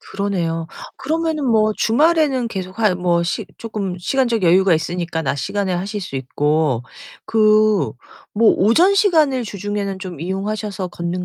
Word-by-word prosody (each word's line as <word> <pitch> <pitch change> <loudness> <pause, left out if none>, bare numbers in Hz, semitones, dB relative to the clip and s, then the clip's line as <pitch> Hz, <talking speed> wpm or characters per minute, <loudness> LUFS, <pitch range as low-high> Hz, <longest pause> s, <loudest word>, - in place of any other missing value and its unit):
그러네요. 175 -5 -3 0.3
그러면은 315 0 -1
뭐 215 -2 +3
주말에는 285 -1 +2
계속 190 0 -6
하 215 -4 +3
뭐 175 -1 +1
시 185 +4 -3
쪼끔 205 -5 -4
시간적 235 +1 0
여유가 185 +2 +4
있으니까 170 0 -3
낮 140 -1 -1
시간에 195 +4 -2
하실 195 +4 -3
수 155 -7 -6
있고 145 -1 0 0.4
그 215 -2 +3 0.4
뭐 225 +1 +5
오전 320 - +4
시간을 310 - +3
주중에는 200 -1 -4
좀 180 -5 -8
이용하셔서 195 +1 -3
걷는 175 +1 -4
200 Hz, 310 characters per minute, -19 LUFS, 175-230 Hz, 0.4 s, 뭐